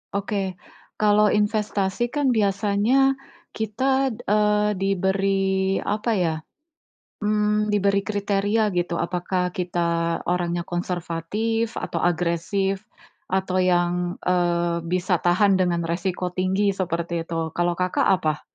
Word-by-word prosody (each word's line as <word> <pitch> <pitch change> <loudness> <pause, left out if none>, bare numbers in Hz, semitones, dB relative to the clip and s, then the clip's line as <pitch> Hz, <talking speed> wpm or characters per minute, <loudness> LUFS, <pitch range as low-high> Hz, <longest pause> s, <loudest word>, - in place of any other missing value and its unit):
Oke 195 -2 -2 0.4
kalau 210 0 +4
investasi 210 +1 0
kan 285 -3 +2
biasanya 210 +5 +2 0.4
kita, 265 +5 0
eee, 210 -2 +2
diberi 195 0 +1
apa 215 +3 -1
ya, 170 -5 +1 0.9
mmm, 210 0 +1
diberi 200 -1 +2
kriteria 205 +1 0
gitu 175 -1 -1
apakah 180 +1 -1
kita 170 -2 -1
orangnya 175 -1 0
konservatif 180 +6 -2
atau 170 - -3
agresif, 175 +3 0 0.5
atau 185 0 0
yang, 175 0 +1
eee, 175 -1 +1
bisa 180 0 0
tahan 190 +3 +3
dengan 175 -3 +1
resiko 180 +1 -2
tinggi 190 +2 +1
seperti 170 -2 -2
itu 165 -1 -3
kalau, 175 0 0
Kakak, 180 0 +1
apa? 155 -5 +1
190 Hz, 105 wpm, -23 LUFS, 175-210 Hz, 0.9 s, kalau